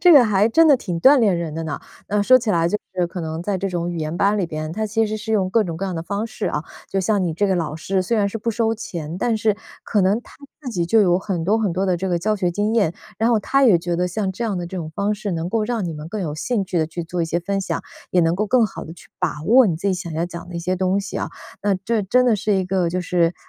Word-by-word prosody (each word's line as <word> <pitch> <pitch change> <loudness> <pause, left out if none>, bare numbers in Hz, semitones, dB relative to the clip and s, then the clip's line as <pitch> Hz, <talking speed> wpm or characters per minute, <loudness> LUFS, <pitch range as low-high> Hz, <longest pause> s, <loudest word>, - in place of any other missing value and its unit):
这 350 0 +7
个 270 -5 +8
还 210 0 +3
真 325 +7 +5
的 285 - +7
挺 180 -8 -4
锻 275 +8 +7
炼 205 -7 +3
人 170 -2 -3
的 165 +1 -4
呢。 155 -3 -4 0.3
呃， 205 0 +1
说 255 +4 +7
起 235 -3 -5
来 170 -1 +2
就 210 - 0 0.2
是 180 -1 +1
可 180 - -6
能 160 0 -4
在 195 0 -1
这 195 - -1
种 175 -1 -2
语 175 - -4
言 155 +1 -3
班 200 +3 +2
里 185 - 0
边， 155 0 -5
它 215 +3 -2
其 225 +2 +1
实 215 0 -2
是 220 +1 -4
用 190 -4 +1
各 225 +2 +3
种 170 -3 -4
各 195 - -3
样 185 - -3
的 - - -2
方 200 +5 -3
式 230 - -4
啊， 150 - -1 0.3
就 195 - 0
像 200 +1 +1
你 165 -2 -1
这 205 +4 +1
个 190 - +2
老 155 -3 -2
师， 190 +4 -1
虽 205 +6 0
然 205 -2 +2
是 225 - -5
不 230 +2 -1
收 225 0 +1
钱， 170 -6 -6
但 230 +2 +1
是 215 -1 +1 0.3
可 210 - +1
能 195 +5 +2
他 - - -17 0.3
自 275 - -6
己 175 -5 -1
就 225 +5 +4
有 180 -2 +3
很 190 -3 -3
多 210 +6 +2
很 205 -6 0
多 190 +3 0
的 185 -2 +1
这 190 +2 -3
个 175 - +1
教 215 +2 +1
学 180 -3 0
经 205 +4 0
验。 200 -8 +3 0.3
然 225 +1 +2
后 230 - +4
他 275 +6 +2
也 220 -8 +6
觉 170 0 -2
得 180 - +1
像 190 +2 -2
这 210 +5 -4
样 210 -4 -1
的 175 - -3
这 185 - -7
种 165 -3 -4
方 205 +1 0
式 205 -1 -3
能 165 +1 -2
够 220 +1 0
让 225 -3 -1
你 170 - -3
们 150 +1 -7
更 210 +3 -4
有 160 -5 -2
兴 215 +4 -1
趣 180 -2 -1
地 155 - +1
去 170 +2 -5
做 170 +1 -4
一 - - +2
些 170 +1 -1
分 195 +2 -2
享， 190 - -3 0.3
也 180 - +4
能 165 +1 +2
够 210 +1 0
更 250 +1 +4
好 210 - -5
地 160 - -9
去 170 - -16
把 160 -4 -2
握 240 +8 +6
你 175 - +1
自 190 +5 -2
己 190 - +2
想 175 -3 -6
要 165 +2 -1
讲 175 0 -8
的 175 - -9
一 170 - -2
些 185 +2 -1
东 185 +2 +1
西 200 - -6
啊。 - - -2 0.3
那 200 -1 +2
这 215 +4 -1
真 250 +6 +3
的 230 -4 +3
是 210 +1 0
一 190 -1 +1
个 185 -1 0
就 180 +2 -1
是 175 -1 +1
190 Hz, 340 characters per minute, -21 LUFS, 170-215 Hz, 0.3 s, 个